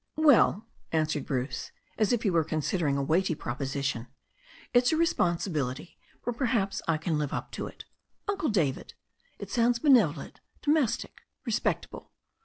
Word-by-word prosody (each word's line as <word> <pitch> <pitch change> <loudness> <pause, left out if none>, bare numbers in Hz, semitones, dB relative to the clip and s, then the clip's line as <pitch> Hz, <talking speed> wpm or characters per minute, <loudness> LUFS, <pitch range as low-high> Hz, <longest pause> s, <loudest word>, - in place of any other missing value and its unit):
"Well," 275 - +5 0.3
answered 155 -3 0
Bruce,' 130 -1 -3 0.2
as 215 +1 +2
if 240 -2 +1
he 200 - +2
were 165 -2 +3
considering 155 -1 0
a 140 - 0
weighty 165 +4 +1
proposition, 135 -1 -3 0.7
"it's 245 0 +5
a 315 - +2
responsibility, 170 - 0 0.3
but 245 -1 -2
perhaps 220 -7 0
I 165 -2 +2
can 155 0 -1
live 145 -2 -2
up - - -4
to - - -4
it. - - -11 0.4
Uncle 395 -6 0
David 160 - -1 0.2
— - - -38
it - - -8
sounds 235 0 +3
benevolent, 265 -2 +3 0.2
domestic, 290 -6 0 0.2
respectable. - - -2
175 Hz, 145 wpm, -28 LUFS, 145-240 Hz, 0.7 s, Well